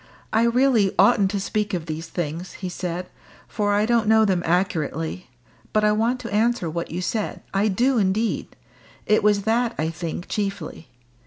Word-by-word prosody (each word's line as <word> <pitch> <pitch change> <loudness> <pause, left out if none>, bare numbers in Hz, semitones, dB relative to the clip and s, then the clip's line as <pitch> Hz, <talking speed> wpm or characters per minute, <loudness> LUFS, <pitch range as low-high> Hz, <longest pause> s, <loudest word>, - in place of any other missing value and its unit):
"I 225 +2 +4
really 235 -4 +3
oughtn't 195 0 +5
to 200 - -2
speak 210 0 -1
of 165 -3 -4
these 160 0 -5
things," 170 +1 -4
he 185 - -5
said, 180 0 -4 0.4
"for 205 -2 -1
I 210 +1 +2
don't 230 -1 +2
know 220 0 +5
them 185 -4 +1
accurately. 165 -2 -1 0.4
But 215 - +2
I 210 - +4
want 230 +4 +1
to 230 -3 -6
answer 225 -3 +1
what 170 +1 -4
you 175 +3 -4
said 215 +3 -3
I 200 +2 +2
do 240 +5 +2
indeed. 210 +3 -1 0.5
It 215 - +3
was 205 -1 +3
that, 230 +2 +1
I 155 +1 0
think, 170 +1 -5
chiefly. 200 -5 -4
200 Hz, 175 wpm, -23 LUFS, 180-220 Hz, 0.5 s, oughtn't